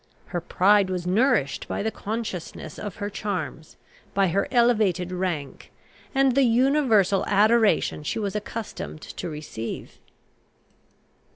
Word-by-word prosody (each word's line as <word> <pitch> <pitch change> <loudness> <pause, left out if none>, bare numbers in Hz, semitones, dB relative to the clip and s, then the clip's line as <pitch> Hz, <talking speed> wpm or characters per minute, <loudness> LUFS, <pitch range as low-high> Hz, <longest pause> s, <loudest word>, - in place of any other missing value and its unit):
Her 175 - -4
pride 195 +3 +3
was 180 -1 -3
nourished 205 - +1
by - - -2
the 220 - 0
consciousness 200 -8 -5
of 205 -3 -5
her 205 - -4
charms, 190 -6 -5 0.4
by 195 -2 +3
her 195 +4 0
elevated 215 -8 +2
rank, 180 -6 -4 0.4
and 270 -1 +4
the 275 - +4
universal 240 -6 +3
adoration 215 -3 +3
she 150 - -3
was 205 -2 -2
accustomed 210 -6 -5
to 180 - -6
receive. 150 -7 -7
200 Hz, 120 wpm, -25 LUFS, 180-225 Hz, 0.4 s, and